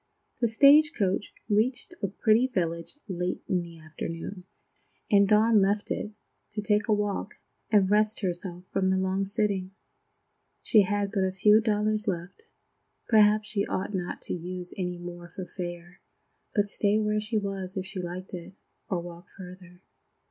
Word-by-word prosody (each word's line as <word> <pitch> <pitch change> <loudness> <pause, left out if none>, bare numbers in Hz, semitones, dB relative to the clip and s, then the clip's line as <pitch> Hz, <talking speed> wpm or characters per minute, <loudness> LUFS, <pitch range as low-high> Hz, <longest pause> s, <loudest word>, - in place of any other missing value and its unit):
The 235 - +3
stage 285 +7 +6
coach 195 -2 0 0.2
reached 230 +9 +1
a 200 - +1
pretty 220 +5 +3
village 170 - -2
late 180 -2 -3
in 180 -2 +1
the 170 -1 -10
afternoon, 165 +4 -7 0.7
and 200 -1 +6
Dawn 215 0 +5
left 205 +2 0
it, - - -2 0.4
to 210 - -2
take 210 0 +2
a - - +1
walk 205 0 -1 0.3
and 205 -3 +4
rest 215 +2 +2
herself 180 -1 -4
from 190 -1 +1
the 190 0 +2
long 190 +1 0
sitting. 195 -2 -1 0.9
She 215 - +6
had 200 0 0
but 200 -3 +1
a 190 - +1
few 210 +3 +5
dollars 215 -1 0
left. 180 - -4 0.6
Perhaps 215 -1 +5
she 205 -2 0
ought 190 +2 -3
not 180 -2 -3
to - - -3
use 180 +1 -5
any 180 -2 -3
more 175 0 -8
for 185 +1 -7
fare, 175 -1 -7 0.5
but 205 -1 +2
stay 205 +1 +1
where 210 0 +1
she 215 +1 -1
was 195 -1 -4
if 190 - -2
she 190 0 -5
liked 180 +2 -7
it, 180 +1 -8 0.3
or 180 -3 -1
walk 175 0 -11
farther. 180 -1 -12
195 Hz, 165 wpm, -27 LUFS, 180-210 Hz, 0.9 s, stage